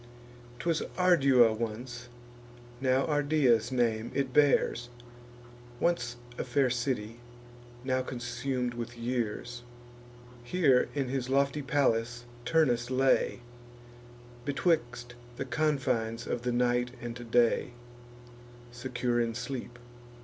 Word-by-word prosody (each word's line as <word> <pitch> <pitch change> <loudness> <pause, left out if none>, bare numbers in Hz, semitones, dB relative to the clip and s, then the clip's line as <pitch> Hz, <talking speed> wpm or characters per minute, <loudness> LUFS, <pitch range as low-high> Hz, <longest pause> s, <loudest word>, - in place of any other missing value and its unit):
'Twas 165 +4 0 0.2
Ardua 140 -11 +5
once; 120 +2 -5 0.7
now 130 0 +2
Ardea's 145 -6 +2
name 115 -3 0
it 135 -2 -1
bears; 130 -4 +3 0.9
Once 170 -8 0 0.2
a - - 0
fair 130 0 +1
city, 120 -3 -2 0.6
now 130 0 0
consum'd 125 0 -3
with 120 0 -6
years. 120 0 -3 0.8
Here, 135 -2 +3
in 135 -3 -1
his 130 -1 -2
lofty 140 +2 +2
palace, 120 -4 0 0.2
Turnus 125 -7 +2
lay, 130 -1 +2 1.0
Betwixt 130 -4 0 0.2
the 135 - -4
confines 125 -6 0
of 120 - -2
the 125 0 -1
night 125 0 +1
and 120 0 -7
day, 120 +1 +2 1.0
Secure 120 -1 -2
in 115 -1 -1
sleep. 125 0 -5
125 Hz, 100 wpm, -30 LUFS, 120-135 Hz, 1.0 s, Ardua